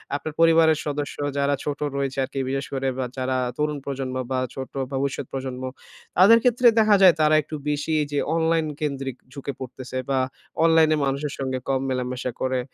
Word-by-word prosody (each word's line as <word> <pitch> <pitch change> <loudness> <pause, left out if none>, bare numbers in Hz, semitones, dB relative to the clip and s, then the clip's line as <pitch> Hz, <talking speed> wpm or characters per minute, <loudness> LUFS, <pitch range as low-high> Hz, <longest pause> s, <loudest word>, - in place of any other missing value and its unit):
আপনার 145 +2 -4
পরিবারের 165 -1 +5
সদস্য 145 -1 -3 0.2
যারা 140 0 +2
ছোট 145 -1 -3 0.2
রয়েছে 135 -1 -2
আরকি 135 +1 -4
বিশেষ 135 0 -2
করে। 135 0 -1
বা 130 - -1
যারা 130 0 -1 0.2
তরুণ 150 0 0
প্রজন্ম 135 -2 -4 0.2
বা 130 - +1
ছোট 130 -1 -5
বা 135 - 0
ভবিষ্যৎ 135 0 -2
প্রজন্ম, 130 -1 -5 0.5
তাদের 210 +5 +8
ক্ষেত্রে 245 0 +4
দেখা 215 -1 +5
যায় 185 -3 +8
তারা 155 0 +5
একটু 155 - -7
বেশি 150 +2 -1
এইযে 145 -1 -2 0.2
অনলাইন 165 0 +2 0.2
কেন্দ্রিক 135 -3 -3 0.2
ঝুঁকে 140 -1 -5
পড়তেছে 130 0 -7
বা 135 - +2 0.4
অনলাইনে 160 -1 +5
মানুষের 140 +1 -2
সঙ্গে 130 -1 -2
কম 135 -1 +1
মেলামেশা 125 0 -2
করে। 130 -1 0
140 Hz, 175 wpm, -24 LUFS, 130-155 Hz, 0.5 s, তাদের